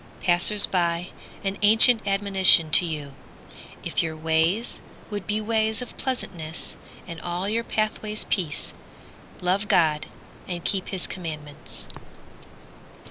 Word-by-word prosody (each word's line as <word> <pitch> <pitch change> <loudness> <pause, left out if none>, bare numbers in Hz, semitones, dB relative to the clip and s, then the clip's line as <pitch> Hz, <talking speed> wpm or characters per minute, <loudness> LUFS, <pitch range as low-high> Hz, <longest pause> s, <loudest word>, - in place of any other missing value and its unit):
Passers 185 +4 +8
by, 175 -1 -2 0.3
an 195 0 -4
ancient 220 +1 +6
admonition 195 -5 +4
to 175 - +6
you: 150 -3 -7 0.7
If - - -2
your 160 -1 -5
ways 160 +8 -1 0.3
would 205 -2 -7
be 210 +1 -2
ways 220 0 -1
of 250 - -9
pleasantness, 170 -11 -6 0.3
And 170 -2 -10
all 175 +2 -5
your 225 +3 -2
pathways 215 -1 -3
peace, 170 -7 -3 0.7
Love 190 +3 -2
God 155 -5 +1 0.4
and 175 -2 -7
keep 195 -3 -2
his 190 -2 -5
commandments. 155 -5 -8
185 Hz, 120 wpm, -23 LUFS, 165-210 Hz, 0.7 s, Passers